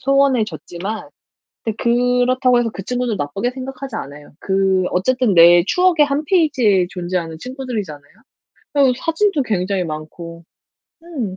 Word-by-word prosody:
소원해졌지만 235 -7 -1 0.5
근데 220 -2 -3
그렇다고 250 +1 +2
해서 235 -1 0
그 195 - -7
친구들 245 0 -2
나쁘게 180 +10 -2
생각하지 265 -1 -7
않아요. 145 -3 -9
그 190 -1 +1
어쨌든 245 +3 +1
내 170 0 +7
추억의 360 - +3
1 285 +2 -1
페이지에 255 - +2
존재하는 175 -3 -4
친구들이잖아요. 215 - -6 0.6
또 275 -3 +4
사진도 330 +3 0
굉장히 195 -4 -1
많고. 165 +2 -8 0.6
음. 260 - -5
230 Hz, 320 characters per minute, -19 LUFS, 180-265 Hz, 0.6 s, 내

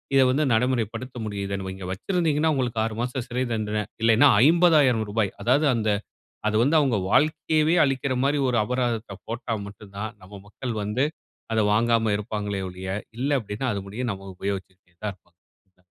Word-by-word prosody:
இத 135 - +7
வந்து 140 +4 +2
நடைமுறைப்படுத்த 125 +1 -1
முடியுது. 100 -2 -4 0.2
இங்க 95 -1 -8
வச்சிருந்தீங்கன்னா 160 - +1
உங்களுக்கு 120 -4 -1
6 110 -1 -2
மாச 125 +2 -2
சிறை 125 +1 -1
தண்டன 105 -1 -1 0.2
இல்லன்னா 115 +5 +6 0.2
ரூ.50,000 130 - +4
அதாது 140 +6 +3
அந்த 110 -2 0 0.6
அது 110 - 0
வந்து 145 +5 +3
அவங்க 135 -6 +2
வாழ்க்கையவே 155 +3 +3
அழிக்கிற 135 -1 0
மாரி 145 +1 +2
ஒரு 120 -1 +2
அபராதத்த 120 -4 -2
போட்டா 115 0 -3
மட்டும் 100 0 -13
தான். 110 +2 -4
நம்ம 95 +2 -13
மக்கள் 120 +3 -5
வந்து 105 +6 0 0.5
அத 110 - +2
வாங்காம 115 0 +2
இருப்பாங்களே 105 -2 -3
ஒழிய, 90 +1 -8 0.3
இல்ல 140 +2 +1
அப்டின்னா, 110 +4 -4
அது 100 - -3
முடிய 110 +6 -4
நம்ம 95 0 -9
உபயோகிச்சுட்டே 95 -2 -6
தான் 105 -2 -2
இருப்போம் 90 -1 -33 0.4
அ. - - -33
115 Hz, 160 wpm, -25 LUFS, 105-130 Hz, 0.6 s, இத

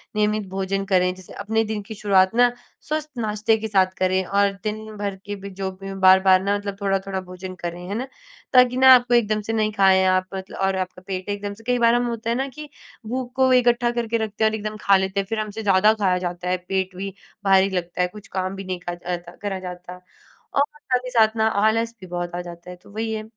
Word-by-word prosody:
नियमित 210 -1 +1
भोजन 195 +1 -2
करें, 180 -2 +2
जैसे 185 -1 -13
अपने 220 +2 0
दिन 215 -1 -3
की 220 - -8
शुरुआत 195 0 +3
ना, 245 0 +5 0.3
स्वस्थ 305 0 -3
नाश्ते 215 0 +1
के 220 +1 -4
साथ 190 -2 +4
करें 185 0 +2
और 200 +1 +2
दिन 215 0 -4
भर 200 -1 -3
के 205 0 -4
भी 200 0 -8
जो 190 0 -4
भी 195 +1 -9
हों, 195 0 -6
बार-बार 190 0 +6
ना, 200 +1 +1
मतलब 200 -1 -6
थोड़ा-थोड़ा 195 -1 -1
भोजन 185 0 -8
करें, 175 0 -6
है 200 - -3
ना? 255 +4 -3 0.5
ताकि 250 -1 +5
ना, 260 0 +9
आपको 245 0 +1
एकदम 215 -2 +2
से 220 +2 -4
नहीं 215 -1 +1
खाएँ 190 -1 +5
आप, 185 0 +3
मतल 190 0 -7
और 195 0 0
आपका 185 0 -4
पेट 185 0 -4
एकदम 205 0 -3
से 225 - -17
कई 245 0 +2
बार 235 0 +5
हम, 245 0 +1
होता 230 -1 -3
है - - +1
ना 270 +1 -1
कि 300 +3 -10 0.4
भूख 250 +1 -4
को 260 0 +4
इकट्ठा 240 -1 +3
करके 235 -1 -1
रखते 220 0 -2
हैं 220 - +3
और 220 - -2
एकदम 215 0 -5
खा 200 -1 +5
लेते 190 +1 -1
हैं, - - -8
फिर 225 -1 -1
हमसे 215 +1 -4
ज़्यादा 205 +2 +5
खाया 185 -1 +3
जाता 175 +1 -5
है। 185 - +1
पेट 190 -1 -1
भी 195 0 -5 0.3
भारी 195 0 +5
लगता 180 -1 -3
है, 180 - +3
कुछ 210 +3 -13
काम 185 +1 -2
भी 195 - -6
नहीं 185 -1 -4
करत 175 -1 -7
अता 175 0 -14
करा 200 -2 -3
जाता, 180 0 -8 0.5
और 280 - +4 0.2
साथ 255 -3 -1
ही - - -4
साथ 220 -1 +4
ना, 220 0 +3
आलस 220 +2 +1
भी 185 - -9
बहुत 175 0 -4
आ 180 - -2
जाता 175 0 -10
है। 180 - -7
तो 180 - -19
वही 220 +1 -3
है। 215 0 -3
200 Hz, 245 wpm, -23 LUFS, 185-220 Hz, 0.5 s, ना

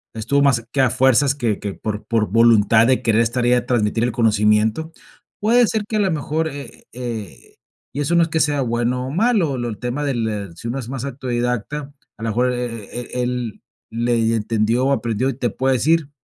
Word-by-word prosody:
estuvo 115 +6 +1
más 125 -5 +2
que 135 - +1
a 130 - +4
fuerzas 130 +3 +3
que 115 -7 -1
que 100 -2 -5
por 105 -1 -4
por 115 -2 +1
voluntad 115 0 +5
de 130 -1 +2
querer 115 -1 +3
estar 120 +1 0
y 120 - +3
de 125 0 +4
transmitir 115 -2 0
el 125 - 0
conocimiento. 110 +5 +2 0.5
Puede 235 +3 +4
ser 220 -1 -1
que 215 - -1
a - - +1
la 200 -2 +2
mejor, 160 0 -1
eh 140 -1 -10
eh, 115 -5 -7 0.4
y 145 - -2
eso 160 +4 0
no 170 - +5
es 165 - -2
que 160 - 0
sea 145 -2 +1
bueno 120 +1 -1
o 130 - -5
malo, 185 - +1
lo 120 - -2
del 110 -3 -5
tema 125 +6 -3
del, 120 -6 -1
eh, 105 -3 -4
si 100 - -8
uno 125 +4 -3
es 120 -3 -7
más 135 -1 -4
autodidacta, 125 +2 -3 0.2
a 115 - -9
la 115 - -1
mejor 125 +3 +1
é 120 -3 -4
é 120 - -5 0.2
é - - 0
él, 125 -3 -3 0.3
le 120 +1 0
y 115 0 +1
entendió 115 +2 0
o - - +2
aprendió, 120 0 0
y 135 - -3
te 125 -1 -1
puede 130 +4 0
decir, 155 +4 +1
125 Hz, 225 wpm, -20 LUFS, 115-140 Hz, 0.5 s, voluntad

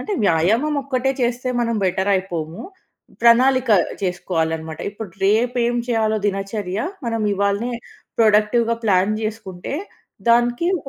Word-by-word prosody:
అంటే, 420 - -4
వ్యాయామం 220 - +2
ఒక్కటే 265 0 0
చేస్తే, 245 +1 -1
మనం 230 -1 0
బెటర్ 190 +2 0
అయిపోము. 170 -3 -3 0.6
ప్రణాళిక 250 +1 +5 0.3
చేసుకోవాలనమాట. 160 -3 -2
ఇప్పుడు, 205 -2 -8
రేపేం 240 +3 +2
చేయాలో! 220 -2 +1
దినచర్య, 195 -1 -3 0.3
మనం 230 -1 -1
ఇవాళనే 200 +4 0 0.5
ప్రొడక్టివ్‌గా 225 +1 +3
ప్లాన్ 195 0 +3
చేసుకుంటే, 215 0 -5 0.5
దానికి 240 +6 +3
ఒక 275 - -10
220 Hz, 110 wpm, -21 LUFS, 190-240 Hz, 0.6 s, ప్రణాళిక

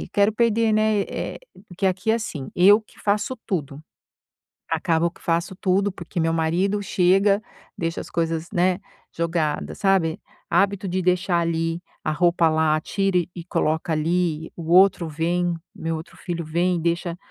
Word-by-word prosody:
E - - -6
quero 200 +1 +3
perder, 230 0 +2
né, 215 -1 +2
eh - - -5 0.3
porque 190 +2 -2
aqui 190 +3 0
é - - +4
assim, 160 - -4
eu 200 +4 +6
que 215 - -23
faço 210 +5 0
tudo, 150 -8 -3 0.9
acabo 165 +1 +1
que - - -22
faço 170 +2 -1
tudo, 195 +1 +1
porque 175 -2 -5
meu 165 0 +1
marido 175 +5 +1
chega, 195 +2 +3 0.3
deixa 165 0 -2
as - - -8
coisas, 165 -1 -1
né, 180 +1 +2 0.4
jogadas, 165 -2 -1
sabe. 190 -4 +2 0.3
Hábito 195 +2 +1
de 185 0 -1
deixar 180 0 +2
ali, 165 0 -1 0.2
a 155 - 0
roupa 170 +1 +3
lá, 155 -1 +2
tira 195 +3 -1
e 175 - -1
e 170 - -7
coloca 160 -1 0
ali, 160 0 0
o 165 -1 -6
outro 185 -2 +5
vem, 170 +3 0 0.2
meu 165 0 -3
outro 160 +2 -10
filho 170 -2 -4
vem, 170 +3 0
deixa 170 +1 -1
175 Hz, 165 wpm, -23 LUFS, 165-195 Hz, 0.9 s, eu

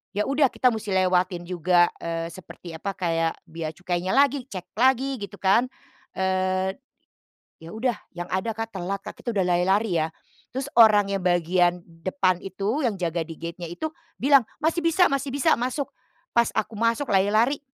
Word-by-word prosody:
ya 210 - +1
udah 275 0 +4
kita 255 - +3
musti 215 -4 -3
lewatin 185 -1 +2
juga, 175 0 +3
eee, 165 0 -4
seperti 175 -1 -11
apa 195 +4 -4
kayak 165 -2 0 0.2
bea 160 -1 -5
cukainya 175 +2 -2
lagi, 275 0 +3
cek 185 -8 -8
lagi, 265 +2 +3
gitu 200 -1 -7
kan, 200 +6 +4 0.5
eee, 185 0 0 0.9
ya 165 - -9
udah, 235 +1 -1 0.2
yang 175 0 -6
ada 190 +5 -1
Kak 225 0 -6
telat 190 +2 -3
Kak. - - -9
Kita 235 - -2
udah 190 - +3
lari-lari 180 +2 +2
ya 155 - -1 0.4
terus 265 +3 -3
orang 215 -3 +7
yang 195 -2 -2
bagian 175 0 +2 0.2
depan 185 -1 +2
itu, 200 +9 -2
yang 210 -6 -1
jaga 170 -1 -1
di 165 -1 -10
gate-nya 170 +1 -6
itu 315 - -3 0.3
bilang, 275 -1 +5 0.2
"Masih 330 +1 0
bisa, 335 +2 +4
masih 275 -1 -2
bisa, 285 +4 +3
masuk!" 255 +4 -2 0.5
Pas 235 0 +3
aku 215 0 -2
masuk 230 +5 0
lari-lari 215 +8 +3
195 Hz, 170 wpm, -25 LUFS, 180-240 Hz, 0.9 s, orang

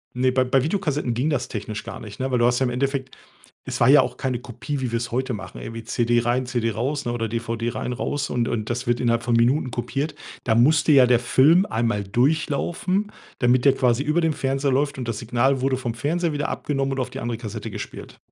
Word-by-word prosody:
Ne, 130 +1 +2
bei 130 0 +2
bei 130 +1 +2
Videokassetten 150 - -1
ging 140 +6 0
das 130 -3 -1
technisch 105 -1 -5
gar - - -7
nicht, 105 -1 -10
ne? 130 +1 -1
Weil 125 - +1
du 120 - +3
hast 120 0 +3
ja 135 - +2
im - - 0
Endeffekt 135 +2 -2 0.5
es - - -4
war 120 - +5
ja 145 +1 +8
auch 125 -1 -4
keine 130 -2 -1
Kopie, 125 +4 -5
wie 125 -3 -3
wir's 120 +1 -2
heute 130 +2 -1
machen, 95 -2 -8
irgendwie 115 0 -7
CD 120 +1 +1
rein, 120 +2 0
CD 120 -2 -1
raus, 135 +7 -2
ne, 120 - 0
oder 115 -2 -2
DVD 115 0 -3
rein 125 - -3
raus 145 +3 -2
und 120 -1 0
und 110 -1 -3
das 120 +1 -2
wird 120 0 +1
innerhalb 115 -1 +1
von 120 0 0
Minuten 125 +3 +2
kopiert. 135 +6 -3 0.3
Da 110 - +2
musste 150 +6 +4
ja 130 -3 +7
der 120 -1 +4
Film 155 +10 +4
einmal 110 -2 0
durchlaufen, 160 - 0 0.3
damit 125 +1 +3
der 135 - +6
quasi 125 -1 +2
über 155 +4 +1
dem 160 -1 +2
Fernseher 135 0 -1
läuft 140 +2 +1
und 125 -3 -5
das 115 -3 -2
Signal 125 +3 +1
wurde 130 0 +1
vom 120 -2 -3
Fernseher 160 +8 -1
wieder 145 0 -2
abgenommen 135 -2 -2
und 135 - -2
auf 130 0 -3
die - - -6
andere 120 -1 -3
Kassette 110 -1 -6
gespielt. - - -8
125 Hz, 235 wpm, -23 LUFS, 120-140 Hz, 0.5 s, ja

